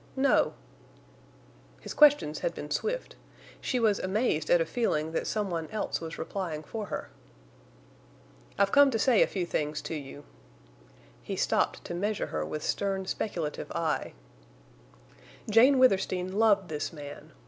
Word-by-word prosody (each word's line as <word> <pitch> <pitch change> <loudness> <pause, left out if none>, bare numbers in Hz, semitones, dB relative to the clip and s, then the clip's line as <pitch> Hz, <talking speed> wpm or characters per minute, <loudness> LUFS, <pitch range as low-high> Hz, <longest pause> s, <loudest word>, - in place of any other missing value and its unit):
"No." 270 +1 +3 1.2
His - - -7
questions 290 - +5
had 170 - -2
been 150 0 -7
swift. - - -2 0.5
She 255 - -1
was 215 -4 +2
amazed 190 -6 0
at 175 - +5
a 165 - +1
feeling 160 -10 -1
that 165 - -2
some 210 -3 -1
one 165 -2 -3
else 215 -5 -3
was 165 0 -6
replying 165 -3 -4
for 215 +6 -6
her. - - -5 1.5
"I've 200 0 +3
come 285 0 +7
to 235 - 0
say 235 0 +4
a - - +5
few 185 -3 -2
things 150 -2 -2
to - - -5
you." 145 -1 -7 1.0
He - - -5
stopped - - 0
to - - -5
measure 205 +4 -1
her 75 0 -1
with 150 - -5
stern, 195 -1 -1
speculative 170 -6 -3
eye. 165 -2 -1 1.3
Jane 245 +6 +6
Withersteen 190 -6 +2
loved 205 -3 +3
this 150 -1 -3
man. 145 -3 -10
190 Hz, 150 wpm, -29 LUFS, 155-220 Hz, 1.5 s, come